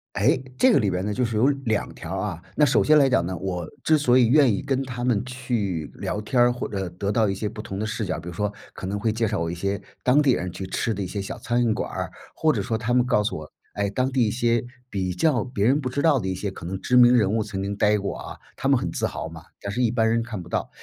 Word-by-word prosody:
哎， 130 +10 +3 0.2
这 260 - +6
个 140 - +5
里 100 -3 +1
边 90 +1 -2
呢， 105 - -1
就 125 - +1
是 115 -2 -2
有 120 +5 +4 0.2
两 110 -2 0
条 - - -6
儿 - - -1
啊。 - - -9
那 150 - +5
首 140 - +3
先 155 0 +5
来 140 -2 +5
讲 85 -9 +2
呢， 90 0 -3
我 90 -3 -3 0.2
之 155 - +5
所 130 -4 +4
以 120 - +5
愿 130 -1 +5
意 100 - -1
跟 135 -1 -1
他 125 -2 -5
们 120 -3 +1
去 120 - -2
聊 105 - -3
天 120 +3 +2
儿， 120 0 +5
或 120 - -4
呃， 95 -2 -2
得 100 +4 -3
到 110 -2 +2
一 - - -1
些 105 +2 -3
不 105 +1 -8
同 95 -2 -6
的 110 - -2
视 110 0 -3
角， 90 -3 -2
比 85 +1 -8
如 - - -6
说 105 +4 -2 0.2
可 95 - -6
能 100 +1 -2
会 110 +1 0
介 115 -1 0
绍 105 - -1
我 85 - -1
一 85 - -3
些 100 +3 -2 0.2
当 130 +4 +4
地 140 -3 +4
人 90 -5 -2
去 95 +1 -6
吃 110 +4 -1
的 100 - -4
一 95 - -2
些 100 +2 -4
小 100 - -6
餐 120 -2 +1
馆 105 - -2
儿， - - -4 0.2
或 155 -1 +2
者 110 - -1
说 110 +3 -2
是 - - -4
他 120 +1 -1
们 125 0 +3
告 105 -4 +3
诉 105 - -2
我， 75 0 -10 0.2
哎， 100 0 0
当 130 +6 0
地 130 -3 +2
一 105 - 0
些 120 -1 +1 0.3
比 95 -3 -2
较 125 - +2
别 105 -5 -2
人 140 +5 +4
不 130 - -2
知 140 +3 -2
道 155 -5 +4
的 95 - -4
一 95 - -1
些 100 +2 -3
可 90 - -9
能 95 +2 -4
知 125 - +2
名 125 0 +8
人 105 -4 +3
物 110 0 +1
曾 100 -2 -4
经 100 +1 -3
待 105 +1 +3
过 100 -1 -3
啊， - - -8 0.2
他 - - -1
们 - - +5
很 - - -3
自 - - -1
豪 - - -5
嘛， - - -11 0.2
但 100 - -4
是 120 - -2
一 120 -2 +2
般 115 -2 +2
人 115 +1 +2
看 105 -7 -6
不 85 - -12
到。 - - -2
110 Hz, 330 characters per minute, -24 LUFS, 100-125 Hz, 0.3 s, 名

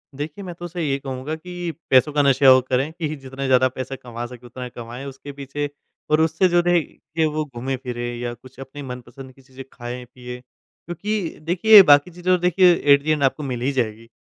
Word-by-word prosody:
देखिए, 150 +7 -6
मैं 180 -2 -6
तो 175 - -8
उसे 175 0 -5
ये 140 -2 0
कहूँगा 135 +3 -5
कि 175 +1 -6 0.2
पैसों 130 +3 +5
का 145 - +3
नशा 135 -1 +5
और 130 - +5
करें 135 +4 +1
कि 165 -2 -3
जितना 135 -1 -7
ज़्यादा 130 0 +4
पैसा 130 +1 -6
कमा 120 -2 -7
सकें 125 0 -12
उतना 125 +1 -7
कमाएँ 120 +2 -8
उसके 140 +1 -9
पीछे 140 +1 -5 0.4
और 155 - +4
उससे 165 +3 +3
जो 175 0 +3
रहे 175 -1 +3
के 160 +1 -4
वो 155 0 -1
घूमें-फिरें 125 -2 -5
या 120 0 -3
कुछ 130 +2 -16
अपने 135 +2 -9
मनपसंद 125 +1 -9
की 135 - -21
चीज़ें 135 0 -12
खाएँ-पिएँ। 125 0 -8
क्योंकि 175 +8 -6
देखिए 195 +6 +7
बाकी 145 +1 +5
चीज़ें 180 +2 0
तो 180 - +4
देखिए 180 0 +5 0.2
एक 140 0 +3
दिन 155 -2 +1
आपको 135 +3 +1
मिल 125 -3 -4
ही 135 - +1
जाएगी, 115 -4 -2
135 Hz, 205 wpm, -22 LUFS, 125-160 Hz, 0.4 s, देखिए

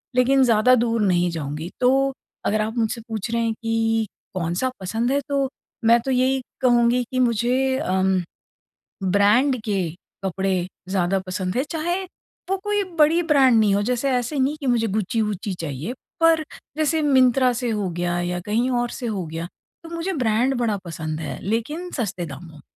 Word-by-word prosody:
लेकिन 265 +2 +4
ज़्यादा 240 +1 +5
दूर 230 -1 +1
नहीं 180 -3 +2
जाऊँगी 155 +1 -4
तो 270 +2 +3 0.3
अगर 215 +1 +1
आप 220 +3 -3
मुझसे 230 0 0
पूछ 220 -1 -4
रहे 235 0 +1
हैं 230 -1 0
कि 225 -1 +1 0.3
कौन-सा 180 +7 -1
पसंद 225 +7 -1
है 280 - +2
तो 275 -1 +1 0.4
मैं 235 +1 +6
तो 265 - 0
यही 260 +1 +2 0.2
कहूँगी 240 0 +4
कि 255 - -1
मुझे 250 +2 +2
उम, 190 0 +2 0.8
ब्रांड 205 +8 +3
के 195 -5 0 0.4
कपड़े 190 -1 0 0.2
ज़्यादा 190 0 +1
पसंद 185 0 -3
है 260 - +2
चाहे 345 +3 -1 0.5
वो 385 - +1
कोई 415 -1 +1 0.2
बड़ी 315 +3 +5
ब्रांड 260 -5 +5
नहीं 210 -2 +3
हो 200 - +2
जैसे 250 +5 0
ऐसे 250 +3 -1
नहीं 270 +3 +1
कि 280 - -4
मुझे 235 -2 +2
गुच्ची-वुच्ची 210 -1 -1
चाहिए। 150 - -4 0.3
पर 330 -1 +5 0.3
जैसे 315 +1 +1
मिंत्रा 260 -3 +4
से 245 - 0
हो 210 -4 -1
गया 175 0 -1
या 175 0 -2
कहीं 230 +4 +1
और 240 -1 0
से 245 - -6
हो 200 -5 -2
गया। 165 +2 -5 0.4
तो, 330 - -10
मुझे 335 +3 -3
ब्रांड 250 -2 +1
बड़ा 225 -4 +1
पसंद 155 -2 -4
है 160 - -5
लेकिन 255 - -2
सस्ते 195 - -2
दामों 160 +2 -10
में। 150 - -14
230 Hz, 175 wpm, -23 LUFS, 190-260 Hz, 0.8 s, मैं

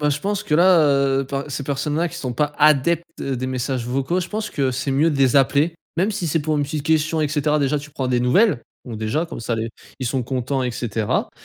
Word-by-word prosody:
ben 150 0 +2
je 145 - -2
pense 205 +2 -1
que 180 -8 0
là, 180 0 +6
heu, 140 -2 +3
enfin, 140 0 -2
ces 140 0 -4
personnes 145 +2 -2
là 170 +2 +1
qui - - -9
sont 125 -2 -4
pas 145 +4 0
adeptes 155 +3 +3 0.2
des 130 -2 -2
messages 130 -1 -2
vocaux, 135 +8 0
je 180 - -5
pense 210 0 -4
que 135 -3 0
c'est 130 +2 -2
mieux 140 +5 +3
de 145 - -2
les 135 -1 +3
appeler. 140 +5 +3 0.2
Même 190 +6 +2
si 185 -4 -3
c'est 160 +1 +1
pour 155 +1 -1
une 145 - +1
petite 150 +1 -4
question 160 0 +1
et 150 - +1
cetera. 150 0 +1
Déjà 145 +1 +1
tu 145 +2 -10
prends 130 -2 -3
des 125 -1 +1
nouvelles. 130 - +3 0.2
Bon 120 -4 -7
déjà, 110 +10 -1
comme 165 - -8
ça 115 0 -2
les 115 0 -3 0.3
ils 130 - -2
sont 130 +1 -1
contents 130 +2 -2
et 125 - -1
cetera. 115 -3 -1
140 Hz, 255 wpm, -21 LUFS, 130-155 Hz, 0.3 s, là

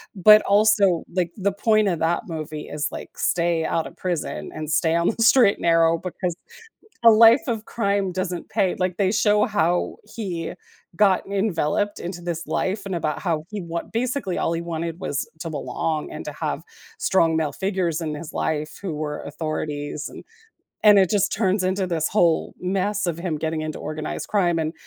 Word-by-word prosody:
but 210 +3 +8
also, 200 -4 +4
like, 175 -2 0
the 200 -1 0
point 215 +1 +2
of 175 -4 0
that 165 +2 +1
movie 155 -2 -6
is 150 0 -2
like - - -9
stay 170 -1 +1
out 165 0 -1
of - - -13
prison 175 -4 -3
and 155 -1 -5
stay 160 +1 +2
on 170 0 +2
the 230 +1 0
straight 230 -3 +6
and - - -14
narrow 165 0 +4
because 180 0 -4 0.7
a 230 - +9
life 225 +3 +7
of 225 -3 -2
crime 200 -3 0
doesn't 180 -1 -4
pay. 185 - +1
Like, 185 -1 -1
they 195 -2 +2
show 210 -1 +3
how 180 -4 0 0.2
he 180 -7 -4 0.4
got 195 0 +3
enveloped 200 -1 0
into 175 0 -6
this 170 -1 -4
life 195 +3 -1
and 190 -2 -3
about 155 -3 -2
how 165 -5 -1
he 210 -2 -5
want 170 -1 -5
basically 235 -5 -1
all 165 - 0
he 165 - -2
wanted 170 0 -4
was 145 -8 -3
to 165 - -5
belong 155 +1 -3
and - - -7
to - - -4
have - - -3 0.4
strong 165 - +2
male 155 -2 0
figures 185 -4 -1
in 155 -2 -3
his 150 +1 -7
life 155 -1 -2
who 190 -5 -3
were 150 -1 -4
authorities 150 -2 -4
and - - -11 0.6
and 210 -1 +7
it 190 -2 +4
just 200 -1 +2
turns 195 -2 +1
into 185 +1 0
this 165 -3 0
whole 170 -5 +2
mess 195 +2 -1
of 170 -2 -2
him 170 -3 -2
getting 160 +1 -2
into 155 -1 -4
organized 155 0 -5
crime 175 -5 +2
and 160 0 -1
175 Hz, 190 wpm, -23 LUFS, 160-200 Hz, 0.7 s, a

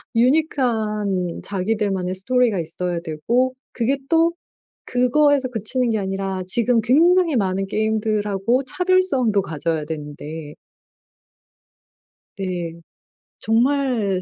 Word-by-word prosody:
유니크한 220 - +1
자기들만의 195 -2 -1
스토리가 230 +1 +1
있어야 170 +1 -3
되고 235 +12 0 0.2
그게 255 +3 0
또 330 0 +3 0.5
그거에서 270 +2 +3
그치는 245 +2 -1
게 220 - +1
아니라 195 -1 -3
지금 235 +4 +2
굉장히 330 +6 +4
많은 195 -2 0
게임들하고 215 +2 0
차별성도 275 - +2
가져야 160 -2 -2
되는데 150 0 -7 1.8
네. 175 -3 -4 0.6
정말 235 -5 +1
215 Hz, 240 characters per minute, -21 LUFS, 185-255 Hz, 1.8 s, 굉장히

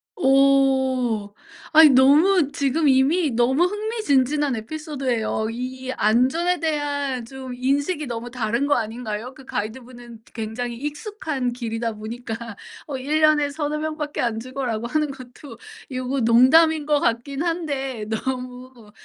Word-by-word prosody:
오. 265 - +2 0.4
아니 315 0 +8
너무 290 +5 +5
지금 285 +3 0
이미 280 +4 +3
너무 245 +7 +2
흥미진진한 300 - 0
에피소드예요. 255 -4 -3
이 255 +2 -5
안전에 260 - +2
대한 285 -5 -2
좀 260 +1 -8
인식이 285 +5 -1
너무 235 0 -5
다른 235 +2 -1
거 290 - +3
아닌가요? 225 +1 -4
그 265 - -14
가이드분은 235 +1 -7
굉장히 235 +2 -4
익숙한 295 - -4
길이다 230 -1 -3
보니까 225 +2 -6 0.5
"어 280 -3 -4
1 295 +4 -1
년에 305 -2 +4
3-4 300 0 -2
명밖에 310 -1 -4
안 230 -2 -1
죽어."라고 245 -2 -4
하는 300 +2 0
것도 255 -1 -12 0.3
요거 255 +1 -2
농담인 290 +7 +5
것 295 -1 +2
같긴 270 +5 -1
한데 280 -9 -3
너무 250 -1 -5
265 Hz, 270 characters per minute, -22 LUFS, 240-295 Hz, 0.5 s, 아니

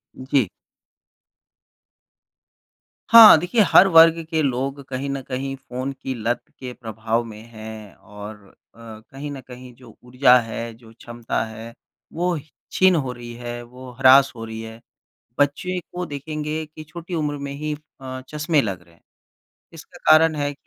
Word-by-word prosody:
जी। 130 -3 0 2.6
हाँ, 225 -7 +10
देखिए, 185 +7 +1
हर 195 - +7
वर्ग 165 -1 +7
के 160 -2 0
लोग 135 +1 -2
कहीं 135 +1 -4
न 135 -1 -3
कहीं 135 +1 -4
फ़ोन 130 +1 -6
की 130 0 -6
लत 120 +2 -2 0.2
के 125 -1 -7
प्रभाव 110 0 -3
में 110 -2 -11
हैं 110 -2 -10
और 105 +1 -11
अ, - - -22 0.3
कहीं 115 +6 -10
न 135 -2 -8
कहीं 125 0 -12
जो 120 -3 -17
ऊर्जा 125 0 +4
है, 115 0 -6
जो 115 0 -18
क्षमता 120 -1 -4
है, 110 +1 -10 0.4
वो 175 0 -1 0.3
छिन 185 -1 +4
हो 135 -5 -1
रही 120 -1 -10
है, 120 0 -7
वो 125 +2 -12
हरास 135 +1 +6
हो 115 - -8
रही 110 0 -7
है। 115 +1 -10 0.6
बच्चे 180 +6 0
को 180 0 -4
देखेंगे 155 +1 -5
कि 155 +1 -12
छोटी 170 +3 -10
उम्र 150 -2 -2
में 140 - -6
ही 150 +2 -4 0.3
अ, 130 0 -7
चश्मे 150 0 +1
लग 95 -6 -4
रहें 85 -1 -24
हैं। - - -32 0.7
इसका 165 +2 -14
कारण 155 0 +6
है 145 0 -2
कि - - -38
130 Hz, 160 wpm, -22 LUFS, 115-150 Hz, 2.6 s, हाँ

